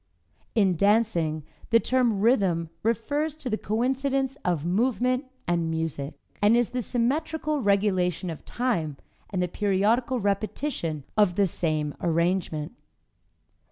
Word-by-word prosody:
In 195 Hz, -5 st, +3 dB
dancing, 190 Hz, -7 st, +2 dB, 0.3 s
the 230 Hz, -1 st, +6 dB
term 240 Hz, -5 st, +1 dB
"rhythm" 190 Hz, -8 st, +2 dB
refers 285 Hz, +7 st, 0 dB
to 290 Hz, -6 st, -6 dB
the -, -, +2 dB
coincidence 265 Hz, +4 st, 0 dB
of 170 Hz, -4 st, 0 dB
movement 250 Hz, +7 st, +1 dB, 0.2 s
and 170 Hz, -1 st, +1 dB
music, 160 Hz, -3 st, -3 dB, 0.3 s
and 210 Hz, +3 st, +5 dB
is 240 Hz, -2 st, +2 dB
the 250 Hz, 0 st, -2 dB
symmetrical 295 Hz, +6 st, -1 dB
regulation 190 Hz, -4 st, +1 dB
of 160 Hz, -, -9 dB
time 170 Hz, -, -1 dB, 0.3 s
and 185 Hz, -2 st, -1 dB
the -, -, 0 dB
periodical 210 Hz, +7 st, +1 dB
repetition 200 Hz, -, -2 dB
of 205 Hz, -5 st, +3 dB
the 200 Hz, -, +4 dB
same 155 Hz, -4 st, -1 dB
arrangement. 170 Hz, -2 st, 0 dB
205 Hz, 125 wpm, -26 LUFS, 170-250 Hz, 0.3 s, the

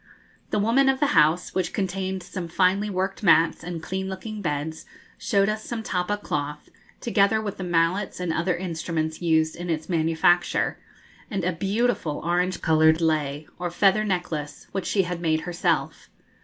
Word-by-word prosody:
The -, -, 0 dB
woman 235 Hz, +6 st, +3 dB
of 265 Hz, 0 st, +1 dB
the 290 Hz, -, +3 dB
house, 155 Hz, +4 st, +3 dB
which 185 Hz, -2 st, -1 dB
contained 190 Hz, -1 st, -2 dB
some 180 Hz, -1 st, -6 dB
finely 190 Hz, +4 st, +2 dB
worked 190 Hz, 0 st, -2 dB
mats 165 Hz, -5 st, +4 dB
and 170 Hz, -1 st, -5 dB
clean 190 Hz, +2 st, -3 dB
looking 210 Hz, +3 st, -6 dB
beds, 155 Hz, -1 st, -3 dB, 0.3 s
showed 200 Hz, -1 st, +2 dB
us 215 Hz, 0 st, -2 dB
some 230 Hz, -2 st, -4 dB
tappa 185 Hz, +1 st, -1 dB
cloth, 150 Hz, -6 st, -4 dB, 0.3 s
together 220 Hz, -1 st, +2 dB
with 210 Hz, -2 st, -4 dB
the 185 Hz, -, -5 dB
mallets 175 Hz, +3 st, 0 dB
and 175 Hz, -2 st, -1 dB
other 175 Hz, +2 st, 0 dB
instruments 165 Hz, -2 st, -3 dB
used 160 Hz, -2 st, +2 dB
in 175 Hz, +1 st, -6 dB
its 160 Hz, +1 st, -2 dB
manufacture, 165 Hz, +1 st, +2 dB, 0.5 s
and 195 Hz, -3 st, -2 dB
a 180 Hz, -, +1 dB
beautiful 195 Hz, -3 st, 0 dB
orange 180 Hz, +1 st, 0 dB
coloured 160 Hz, 0 st, +4 dB
lei, 150 Hz, -2 st, 0 dB
or 175 Hz, 0 st, -2 dB
feather 195 Hz, +4 st, +3 dB
necklace, 170 Hz, -7 st, -3 dB
which 195 Hz, -2 st, -3 dB
she 195 Hz, -, +2 dB
had 175 Hz, -1 st, -4 dB
made 160 Hz, -2 st, +1 dB
herself. 175 Hz, +1 st, -1 dB
180 Hz, 165 wpm, -25 LUFS, 160-195 Hz, 0.5 s, mats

